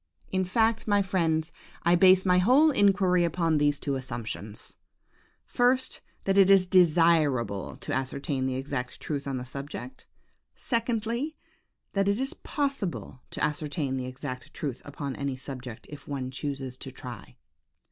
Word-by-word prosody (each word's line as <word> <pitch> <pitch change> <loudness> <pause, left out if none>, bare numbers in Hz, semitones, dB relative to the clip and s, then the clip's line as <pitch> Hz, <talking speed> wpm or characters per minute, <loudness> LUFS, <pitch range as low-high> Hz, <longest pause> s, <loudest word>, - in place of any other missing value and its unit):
In 190 0 +1
fact, 225 +4 +1
my 205 -1 +3
friends, 165 -4 0 0.3
I 170 - +4
base 185 +1 +6
my 180 -1 +5
whole 265 +11 +5
inquiry 195 -6 +4
upon 165 -2 +1
these 145 -1 +2
two 140 - -2
assumptions; 115 -5 -6 0.7
first, 255 +1 +1 0.2
that 195 0 +3
it 195 -1 +6
is 195 -2 +6
desirable 160 - +3
to - - -6
ascertain 135 0 -2
the 130 - -1
exact 130 -2 -4
truth 140 -2 -4
on 135 -1 -2
the 125 - -5
subject; 140 - -8 0.5
secondly, 235 +4 -1 0.6
that 195 -1 +1
it 200 +1 +2
is 270 +1 -1
possible 275 - -3
to - - -4
ascertain 145 -2 -1
the 130 -1 -3
exact 130 0 -7
truth 135 -5 -4
upon 140 -1 -5
any 140 -1 -2
subject, 130 -3 -8
if 150 - -11
one 130 -3 -4
chooses 135 -2 -4
to 130 - -8
try. 125 -5 -9
155 Hz, 145 wpm, -28 LUFS, 130-195 Hz, 0.7 s, base